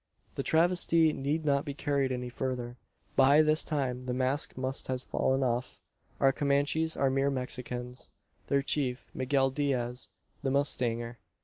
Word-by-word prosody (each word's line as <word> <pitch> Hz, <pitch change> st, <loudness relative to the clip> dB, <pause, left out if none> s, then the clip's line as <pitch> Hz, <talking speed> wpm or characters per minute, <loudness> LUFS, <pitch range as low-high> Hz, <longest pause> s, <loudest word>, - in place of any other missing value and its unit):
The -, -, -3 dB
travesty 165 Hz, -1 st, +3 dB
need 150 Hz, +4 st, -2 dB
not 140 Hz, -1 st, +2 dB
be 140 Hz, -, -6 dB
carried 140 Hz, -2 st, 0 dB
any 125 Hz, -1 st, -3 dB
further. 125 Hz, -1 st, -4 dB, 0.4 s
By 140 Hz, +3 st, +6 dB
this 155 Hz, +1 st, +3 dB
time 130 Hz, -4 st, -2 dB
the 125 Hz, -, -1 dB
mask 130 Hz, +3 st, 0 dB
must 130 Hz, +1 st, -1 dB
have 130 Hz, -1 st, -2 dB
fallen 135 Hz, +1 st, 0 dB
off. 125 Hz, 0 st, -2 dB, 0.4 s
Our 135 Hz, -, +5 dB
Comanches 145 Hz, +4 st, +1 dB
are 135 Hz, -1 st, +2 dB
mere 135 Hz, +1 st, +1 dB
Mexicans; 125 Hz, -1 st, -5 dB, 0.4 s
their 140 Hz, 0 st, +1 dB
chief, 135 Hz, -3 st, 0 dB
Miguel 135 Hz, 0 st, +1 dB
Diaz, 125 Hz, -3 st, -1 dB, 0.3 s
the 135 Hz, -, -1 dB
mustanger. 120 Hz, -4 st, -1 dB
135 Hz, 145 wpm, -30 LUFS, 125-145 Hz, 0.4 s, By